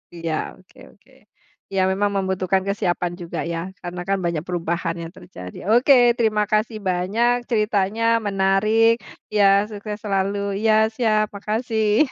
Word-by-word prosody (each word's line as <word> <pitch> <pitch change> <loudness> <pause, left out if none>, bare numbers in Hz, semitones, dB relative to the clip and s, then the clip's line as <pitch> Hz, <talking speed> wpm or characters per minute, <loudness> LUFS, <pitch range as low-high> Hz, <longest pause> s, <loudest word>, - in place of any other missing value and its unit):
Iya 165 -1 -3 0.2
oke 185 0 -24
oke, 210 +6 -27 0.6
ya 195 - +1
memang 200 +1 0
membutuhkan 190 0 0
kesiapan 175 -3 -1
juga 170 - -5
ya 165 - -2 0.2
karena 175 0 -5
kan 195 0 +1
banyak 170 -2 -1
perubahan 170 -1 -2
yang 165 0 -7
terjadi. 90 0 -10
Oke 245 +4 +5 0.2
terima 215 -2 +2
kasih 215 +1 0
banyak, 210 +7 +1
ceritanya 210 -1 0 0.2
menarik 200 +4 +3 0.4
ya, 205 -1 +5 0.3
sukses 210 0 -6
selalu 195 0 0 0.3
ya, 220 -1 +4 0.2
siap 215 -3 +2
makasih 220 +4 +1
200 Hz, 135 wpm, -22 LUFS, 180-215 Hz, 0.6 s, Oke